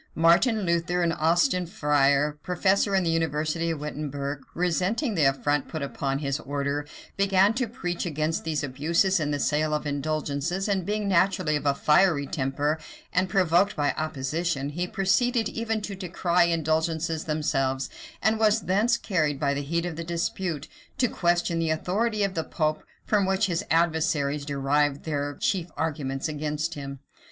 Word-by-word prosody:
Martin 175 +8 +4
Luther, 175 0 0
an 170 - +2
Austin 175 - +2
friar, 145 -3 +2
professor 195 +2 +1
in 190 - +3
the 165 - +1
university 165 +1 0
of 160 -2 -2
Wittemberg, 145 -1 -4
resenting 185 - 0
the 160 -7 +2
affront 135 +1 +1
put 160 -3 -4
upon 135 0 -2
his 140 0 -2
order, 145 0 -2 0.3
began 195 +1 +4
to 250 +1 -1
preach 175 -5 -4
against 155 -1 -1
these 155 -3 -2
abuses 165 +8 +1
in 150 -2 -1
the 145 - 0
sale 150 +2 +1
of 150 - -3
indulgences; 155 +5 -2
and 195 -4 -1
being 210 0 -1
naturally 185 -3 +2
of 145 0 -2
a 140 - +3
fiery 150 0 +3
temper, 145 +3 -1 0.3
and 180 +1 +1
provoked 185 +2 +3
by 145 -1 +1
opposition, 155 0 -2
he 175 +5 -3
proceeded 220 +5 +1
even 225 -1 -2
to 205 - -5
decry 180 -2 +1
indulgences 160 0 0
themselves; 135 -4 0 0.4
and 220 +2 +2
was 215 0 +3
thence 210 +6 +2
carried, 155 -8 0
by 140 -1 +1
the 140 - -2
heat 170 +4 -1
of 175 -2 -4
dispute, 170 -2 -2 0.3
to 250 - +3
question 175 -3 +1
the 165 -1 0
authority 205 +7 0
of 195 -1 0
the 160 - -1
pope, 155 -2 -1 0.2
from 205 -3 +2
which 190 +3 +2
his 180 0 -1
adversaries 155 -3 +1
derived 145 0 0
their 145 -2 -2
chief 180 -3 -1
arguments 145 -3 -2
against 150 +2 -2
him. 140 -2 -6
160 Hz, 160 wpm, -26 LUFS, 145-185 Hz, 0.4 s, Martin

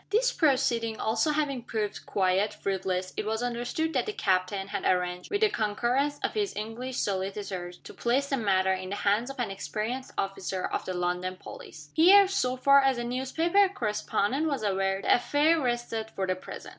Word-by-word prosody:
This - - +2
proceeding 250 -7 +1
also 225 +8 +1
having 290 -4 0
proved 215 -3 -4
quite 190 +2 +1
fruitless, 185 -1 -2
it - - -1
was 220 +2 -2
understood 245 +7 -2
that 255 - 0
the 430 - -2
captain 195 - 0
had 200 - -3
arranged, 180 0 0
with 405 +1 -1
the 435 - +5
concurrence 240 +7 0
of - - -1
his 415 -2 -1
English 230 +4 -5
solicitors, 190 -2 -3
to - - -10
place 260 +4 0
the 275 - +1
matter 190 -4 +2
in 185 0 -5
the 200 - -3
hands 210 +5 +1
of 275 - -8
an 230 -5 -1
experienced 220 +6 -4
officer 190 -1 -2
of - - -3
the 185 - -3
London 180 +1 -2
police. 150 -4 -11
Here, 385 +5 +7
so 260 -10 0
far 275 +2 +6
as 270 -2 +2
the 240 - -2
newspaper 320 +11 +2
correspondent 225 - -1
was 280 -7 -2
aware, 195 -1 0
the - - +4
affair 295 +6 +2
rested 240 -3 -2
for 195 -3 -3
the 185 0 0
present. 185 - -9
225 Hz, 185 wpm, -28 LUFS, 195-275 Hz, -, Here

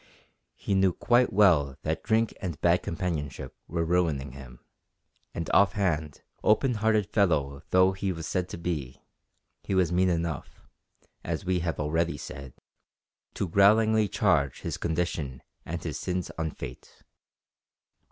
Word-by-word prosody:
He - - -3
knew 95 -2 +3
quite 120 +5 +3
well 80 -10 +4
that 80 +1 -1
drink 115 +1 +1
and 85 -6 -4
bad 85 +1 +3
companionship 80 -6 -4
were 85 0 -1
ruining 80 -6 0
him, 65 -2 -13 0.7
and 85 - -3
off 100 0 +5
hand, 80 -7 -1 0.2
open 125 +5 +3
hearted 110 -2 +3
fellow 80 -9 +1
though 95 +1 +5
he 95 0 -2
was 80 -3 -6
said 90 -1 -2
to - - -6
be, 80 -7 -4 0.6
he 95 - -2
was 90 -3 +2
mean 90 +1 +3
enough, 85 -3 -3 0.6
as - - -3
we 90 0 +1
have 85 -2 -3
already 80 +3 0
said, 70 -2 -9 0.8
to 95 - -1
growlingly 110 +4 +4
charge 70 -7 +1
his - - -3
condition 80 -6 -2 0.2
and 85 +1 -4
his 80 -3 -4
sins 90 -1 -3
on 80 -1 -2
Fate. 60 -4 -10
85 Hz, 140 wpm, -27 LUFS, 75-95 Hz, 0.8 s, off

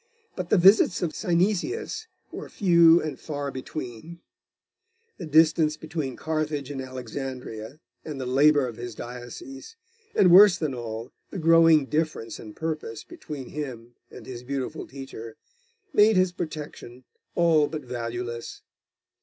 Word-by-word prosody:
But 180 -2 -5
the - - +4
visits 190 0 +5
of 165 - -1
Synesius 215 - -1 0.2
were - - -8
few 170 -3 +5
and 155 -3 -5
far 145 -2 -4
between; 130 +4 -7 1.0
the 170 - -6
distance 155 0 +4
between 155 -5 -4
Carthage 155 -3 -3
and 135 -2 -4
Alexandria, 130 -1 -7 0.2
and 150 -3 -6
the 130 - -4
labour 140 +2 +4
of 115 -2 -8
his 120 -2 -7
diocese, 270 - -9 0.4
and, 180 -3 +5
worse 190 0 +8
than 155 -5 -2
all, 115 -1 -6 0.2
the - - -7
growing 165 -3 +5
difference 150 -6 -2
in 105 -2 -10
purpose 155 -8 -4
between 140 -4 -9
him 125 -5 -7 0.2
and - - -12
his 120 -2 -7
beautiful 135 0 -4
teacher, 130 -5 -9 0.6
made 210 +1 +5
his 185 -1 +3
protection 150 -7 -7 0.3
all 160 -3 +4
but 155 0 -6
valueless. 120 -1 -5
150 Hz, 135 wpm, -26 LUFS, 125-170 Hz, 1.0 s, worse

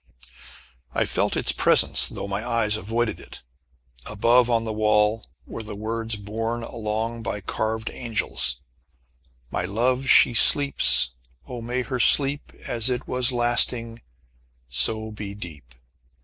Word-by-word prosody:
I - - +1
felt - - -1
its - - +1
presence, - - +2
though - - -7
my 100 +2 -4
eyes 115 -3 +1
avoided 110 +2 -3
it. - - -13 0.6
Above, 115 +4 +2
on 115 -1 0
the 110 -1 -5
wall, 105 0 0 0.2
were - - -8
the 105 -1 -7
words 115 +2 -3
borne 115 +3 -5
along 115 +1 -4
by 105 -1 -5
carved 110 +2 -4
angels: 115 - -1 0.9
"My - - -3
love 125 +7 -1
she 120 - +6
sleeps: 140 - +6 0.3
Oh, 125 -2 -8
may 125 +2 -3
her 130 0 -5
sleep 140 +4 +3
As 115 +1 -2
it 125 -1 -4
was 125 +1 +1
lasting, 120 -1 0 0.7
so 110 - -1
be 105 -1 -8
deep." 75 -11 -12
115 Hz, 135 wpm, -23 LUFS, 105-120 Hz, 0.9 s, she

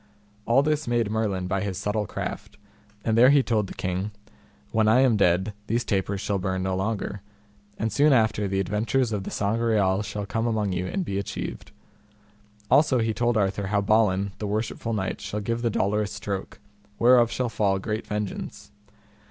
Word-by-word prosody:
All 125 +4 +4
this 150 -1 0
made 120 -3 +1
Merlin 105 -4 -1
by 95 +1 -1
his 100 -3 -3
subtle 105 +1 -1
craft, - - -6 0.5
and 110 - +2
there 120 +3 +7
he 140 -1 +5
told 110 -5 0
the - - -9
king, 95 +3 -2 0.6
When 110 -1 +2
I 115 +4 +5
am 130 -4 +4
dead 95 +1 +2
these 120 +2 0
tapers 100 -1 -1
shall 100 0 -1
burn 95 0 -2
no 95 0 -1
longer, 100 0 -3 0.6
and 110 -2 -2
soon 145 +6 +4
after 110 -5 +2
the 95 0 -1
adventures 110 +6 0
of 100 -3 -3
the - - -4
Sangreal 105 -2 +1
shall 105 0 -4
come 115 +3 -1
among 105 -4 0
you 90 0 -2
and 195 -2 -2
be 100 -7 -2
achieved. 75 -10 -6 1.0
Also 145 -3 +5
he 115 -1 +1
told 120 +1 +1
Arthur 100 -1 0
how 100 +1 +1
Balin 100 -2 +2
the 105 - -3
worshipful 110 +2 -2
knight 95 -3 -2
shall 105 - -4
give 115 +3 -2
the 120 - +1
dolorous 105 0 0
stroke, 100 -2 -5 0.4
whereof 120 -1 +5
shall 125 +1 -1
fall 100 -4 +1
great 105 +3 -4
vengeance. 105 -1 -5
105 Hz, 180 wpm, -25 LUFS, 100-115 Hz, 1.0 s, there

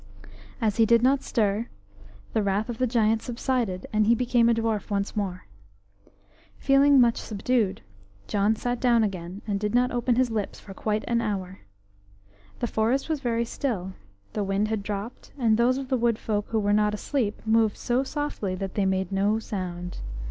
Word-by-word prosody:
As 215 -1 0
he 225 - +5
did 235 +1 +4
not 265 +2 +4
stir, 215 0 0 0.7
the 220 - +2
wrath 200 +3 0
of 235 - -5
the 255 - +2
giant 225 -2 +2
subsided, 235 -6 -2
and 215 0 +3
he 235 - +5
became 240 -1 +3
a - - +5
dwarf 225 -2 -1
once 200 +1 -2
more. 190 -3 -3 1.1
Feeling 275 +1 +4
very 275 - +7
much 235 -1 +3
subdued, 215 - -1 0.4
John 205 - +1
sat 245 +2 -2
down 235 -2 +4
again 185 -1 -4
and 205 -2 -1
did 210 +2 -1
not 250 +1 +3
open 245 0 +1
his 250 -1 +2
lips 215 -3 -3
for 195 - -11
quite 215 +2 -1
an 235 0 +1
hour. 190 -3 -3 1.0
HE - - 0
forest 235 +6 0
was 315 -2 0
very 235 -3 0
still. 210 -7 -3 0.4
The 210 - -1
wind 195 +2 0
had 220 -2 -1
dropped, 205 +3 -6
and 230 -5 +3
those 240 +3 +3
of 270 -1 -5
the 260 - +2
wood 235 -1 +2
folk 210 -2 -2
who 225 - 0
were 205 0 +1
not 210 0 +2
asleep 215 -2 -2
moved 220 -1 +3
so 245 +2 0
softly 275 -9 -3
that 190 0 -5
they 200 -2 +1
made 190 -1 0
no 200 +3 +2
sound. 180 -5 -5
220 Hz, 185 wpm, -26 LUFS, 200-240 Hz, 1.1 s, very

